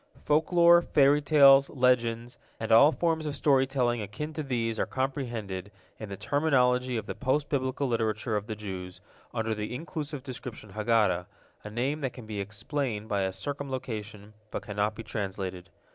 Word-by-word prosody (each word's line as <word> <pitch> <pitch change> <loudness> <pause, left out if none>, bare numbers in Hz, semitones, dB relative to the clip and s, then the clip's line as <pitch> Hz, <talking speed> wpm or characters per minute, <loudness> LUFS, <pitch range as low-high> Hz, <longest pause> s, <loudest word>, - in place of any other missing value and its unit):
Folklore, 170 +3 +5
fairy 145 -2 +4
tales, 140 -2 +6
legends, 120 -2 +1 0.2
and 110 - -3
all 115 +7 +8
forms 160 -2 0
of 145 - -3
story 135 -2 +3
telling 125 -4 0
akin 130 +10 -5
to 155 - -3
these 115 -5 -2
are - - 0
comprehended, 120 -8 -3 0.3
in 110 - -7
the 100 - -6
terminology 125 0 +2
of 110 - -4
the - - -4
post 140 +2 -1
Biblical 135 0 -1
literature 110 -1 -1
of 105 0 -2
the 110 - -4
Jews, 95 -3 -7 0.3
under 115 0 -1
the 105 +3 -4
inclusive 150 -2 -5
description 125 -5 -8
Haggadah, 105 -5 +1 0.4
a 105 - -7
name 130 +8 -2
that 135 -3 -2
can 125 - -10
be 105 -2 -5
explained 110 +2 -3
by 100 -2 0
a 95 0 0
circumlocution, 110 -3 -6 0.2
but - - -5
cannot 105 +1 -1
be 115 - -7
translated. 95 -4 -5
120 Hz, 165 wpm, -28 LUFS, 105-140 Hz, 0.4 s, all